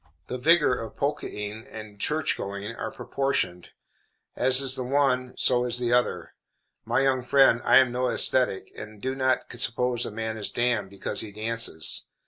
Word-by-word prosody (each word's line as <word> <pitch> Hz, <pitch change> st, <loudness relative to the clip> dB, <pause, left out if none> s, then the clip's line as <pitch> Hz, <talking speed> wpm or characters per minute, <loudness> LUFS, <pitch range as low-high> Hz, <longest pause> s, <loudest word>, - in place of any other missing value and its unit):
The 125 Hz, -, -5 dB
vigor 150 Hz, -3 st, +3 dB
of 115 Hz, -, -8 dB
polkaing 110 Hz, -6 st, -4 dB
and 110 Hz, -2 st, -10 dB
church 155 Hz, +7 st, 0 dB
going 100 Hz, +3 st, -6 dB
are -, -, -4 dB
proportioned; 135 Hz, -10 st, -2 dB, 0.7 s
as 130 Hz, +1 st, +3 dB
is 135 Hz, -1 st, +3 dB
the 130 Hz, -, -3 dB
one 130 Hz, -1 st, 0 dB
so 125 Hz, -1 st, +3 dB
is 125 Hz, 0 st, +1 dB
the 120 Hz, -1 st, 0 dB
other. 125 Hz, 0 st, 0 dB, 0.5 s
My -, -, +1 dB
young 135 Hz, -1 st, +1 dB
friend, 125 Hz, -2 st, +4 dB
I -, -, +5 dB
am 130 Hz, -2 st, +5 dB
no 125 Hz, +1 st, -1 dB
ascetic, 120 Hz, -6 st, +2 dB
and 105 Hz, 0 st, -9 dB
do 130 Hz, +4 st, -3 dB
not 130 Hz, -1 st, +1 dB, 0.2 s
suppose 120 Hz, -1 st, 0 dB
a -, -, -3 dB
man 110 Hz, +1 st, -4 dB
is 105 Hz, -, -1 dB
damned 120 Hz, -5 st, 0 dB
because 100 Hz, 0 st, -5 dB
he 110 Hz, -, -7 dB
dances. 110 Hz, -6 st, -1 dB
125 Hz, 170 wpm, -26 LUFS, 110-130 Hz, 0.7 s, I